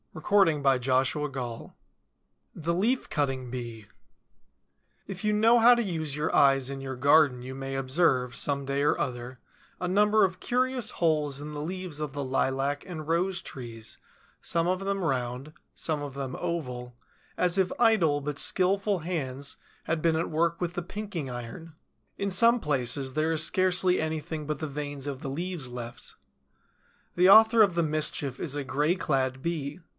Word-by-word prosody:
CHAPTER 165 -2 +3
VI 130 -1 0 0.8
THE 170 +1 -2
LEAF 225 +9 0
CUTTING 135 -4 -1
BEE 120 -3 -6 1.2
If 195 0 -7
you 210 - +2
know 225 +3 +5
how 240 +2 +8
to 240 - +1
use 160 -7 -3
your 150 +2 -1
eyes 135 -1 +4
in 135 0 -6
your 135 -1 -5
garden 140 -1 +4
you 130 +1 -7
may 135 0 -5
observe, 130 -2 +1
some 140 -1 +1
day 140 +1 -1
or 145 - +2
other, 125 -1 -4 0.4
a 180 - -2
number 210 +3 +4
of 185 0 -5
curious 255 -2 0
holes 150 -4 0
in 150 +1 -7
the 145 - -5
leaves 175 -2 -5
of 150 -2 -3
the 140 0 -4
lilac 135 +2 0
and 160 -4 -7
rose 180 +3 0
trees, 115 -7 -9 0.4
some 170 0 0
of 185 +1 0
them 195 0 -2
round, 130 0 -2 0.2
some 155 -2 -2
of 140 -2 -6
them 135 -2 -4
oval, 125 -8 -4 0.4
as 180 +1 +2
if 190 -2 +2
idle 200 -11 +4
but 145 0 -4
skillful 195 +1 +1
hands 140 -5 -4 0.3
had 165 -1 -2
been 165 -1 +2
at 165 - -2
work 170 +2 +1
with 175 -1 -2
the 175 - -3
pinking 180 -5 -5
iron. 125 +7 -8 0.4
In 200 0 -2
some 230 +6 +4
places 135 - -1
there 155 +2 +1
is 160 - +2
scarcely 185 -1 +2
anything 155 0 -4
but 150 -2 -3
the 155 - -3
veins 145 -1 -6
of 140 -1 -5
the 140 - -4
leaves 165 -2 -4
left. 120 -1 -9 1.0
The 180 +2 +5
author 220 +2 +8
of 195 -5 +4
the 170 - +2
mischief 150 -3 -1
is 145 -3 -2
a 145 - -3
gray 150 +6 +1
clad 130 -6 -1
Bee. 155 -1 -3
150 Hz, 170 wpm, -28 LUFS, 135-180 Hz, 1.2 s, how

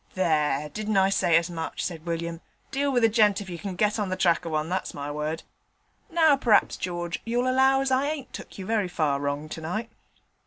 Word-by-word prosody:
'There, 150 -5 +1
didn't 215 +5 -2
I 190 0 +4
say 170 -4 +4
as 170 0 +1
much?' 165 -2 -4
said 165 -2 -6
William. 170 0 -3 0.3
'Deal 280 +1 0
with 245 -3 +2
a - - +8
gent 210 -3 +3
if 195 -3 -7
you 170 - -6
can 190 +1 -5
get 210 +3 +1
on 205 -2 -1
the 185 - -1
track 170 -3 +2
of 165 - -4
one, 155 0 0
that's 185 +2 -3
my 145 0 -4
word. 150 +2 -3 0.7
Now 325 -4 +5
perhaps, 235 -6 +3
George, 175 -1 -4
you'll 240 +2 0
allow 265 +1 +4
as 270 -1 -1
I 265 +2 +2
ain't 295 -3 -5
took - - -9
you 190 - -6
very 215 -2 0
far 150 -5 0
wrong 145 +1 -2
tonight.' 175 +9 -4
185 Hz, 220 wpm, -26 LUFS, 165-230 Hz, 0.7 s, a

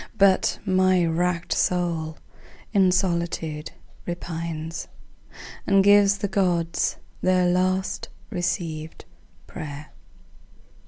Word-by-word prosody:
But 195 -2 +4
my 185 -2 +3
wrack'd 170 +1 0
soul 165 -3 0 0.6
in 190 -3 +4
solitude 170 -4 -1 0.4
repines 165 -2 -5 0.8
And 195 -1 +5
gives 205 0 +6
the 205 +1 -2
Gods 175 -4 0 0.2
their 185 -1 +3
last 185 +2 0 0.2
receivèd 170 -4 -3 0.4
pray'r. 150 0 -8
175 Hz, 85 wpm, -24 LUFS, 165-185 Hz, 0.8 s, gives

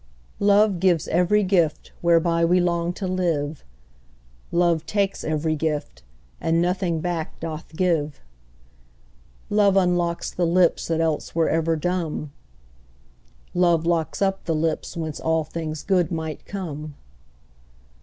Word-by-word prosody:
Love 200 -1 +4
gives 175 -3 +2
every 180 +5 +3
gift 175 -5 +1
whereby 170 0 +3
we 175 +2 +4
long 170 -1 0
to 190 +2 -5
live 165 -5 -1 0.9
"Love 170 -2 +2
takes 200 0 -1
every 155 0 0
gift, 150 - -3 0.4
and 165 0 +1
nothing 175 -1 0
back 170 -2 -3
doth 160 0 -7
give." 160 -5 0 1.3
Love 205 -2 +4
unlocks 175 -2 +1
the 175 -1 0
lips 175 0 +3
that 165 -1 0
else 160 -1 -1
were 165 -1 +2
ever 165 0 +1
dumb: 160 -3 -2 1.2
"Love 170 -2 +3
locks 170 +2 0
up 195 0 -1
the 165 - 0
lips 160 +2 -2
whence 160 -2 -4
all 160 0 +1
things 155 0 -5
good 185 -3 +1
might 160 -2 -4
come." 155 -6 -6
170 Hz, 125 wpm, -23 LUFS, 160-180 Hz, 1.3 s, Love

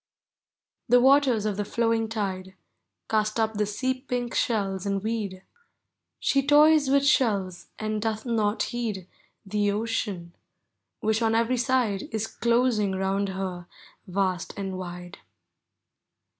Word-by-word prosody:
The 245 - +7
waters 260 -4 +4
of 210 -2 -1
the - - 0
llowiug 225 +1 0
tide 190 -4 -4 0.5
Cast 215 0 0
up 220 0 +1
the 210 -1 0
sea 255 +6 -1
pink 245 -3 -3
shells 195 -5 0
and 200 -1 -2
weed; 210 -4 -3 0.8
She 275 - +2
toys 295 0 +5
with 280 +1 +3
shells, 200 -10 +1
and 215 -1 -2
doth 220 +1 -2
not 220 -3 0
heed 215 -7 -4 0.4
The 205 +1 0
ocean, 205 -5 -3 0.7
which 220 0 +1
on 225 -1 +2
every 230 +2 +2
side 235 -5 0
Is 220 -1 -1
closing 235 -4 +1
round 195 +1 -1
her 185 -2 -5 0.4
vast 185 -1 -2
aud 195 -1 -3
wide. 180 -1 -7
215 Hz, 130 wpm, -26 LUFS, 195-235 Hz, 0.8 s, The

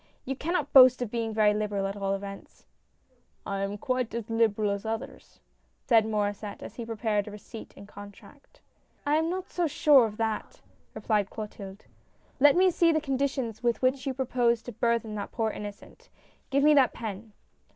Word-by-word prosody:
"You 270 - -3
cannot 305 0 -2
boast 255 -2 +8
of 220 - -6
being 230 -1 -2
very 215 -1 +3
liberal 210 -2 -2
at 195 +1 -3
all 195 -1 -1
events." 195 0 -10 0.4
" 260 - -37 0.3
I 195 0 -3
am 195 +1 -3
quite 255 -1 -2
as 230 -1 -5
liberal 220 -2 +1
as 200 0 -3
others," 225 0 -7 0.4
said 225 -2 +4
Maurdsset, 205 -1 -3
as - - -8
he 235 -2 -6
prepared 215 -2 -1
a - - -7
receipt 210 +2 -10
and 200 - -12
contract. 205 +8 -14 0.2
" - - -39
I 295 +1 +3
am 320 +1 0
not 370 +1 -4
so 350 -2 0
sure 290 -3 +5
of 210 -1 -10
that," 220 -1 -3 0.4
replied 210 -3 0
Clotilde. 200 -2 -8 0.3
" - - -35
Let 285 +1 +6
me 370 +1 +4
see 335 0 +3
the 315 - +2
conditions 270 -5 -2
with 240 +1 0
which 260 +1 +1
you 265 - -2
propose 240 -3 +1
to 245 - -7
burthen 230 -1 -1
that 205 -1 -5
poor 225 -2 -1
innocent. 205 0 -10 0.4
Give 275 0 +2
me 300 +1 +6
that 275 -3 +4
pen." 215 -1 -7
225 Hz, 190 wpm, -28 LUFS, 210-265 Hz, 0.4 s, boast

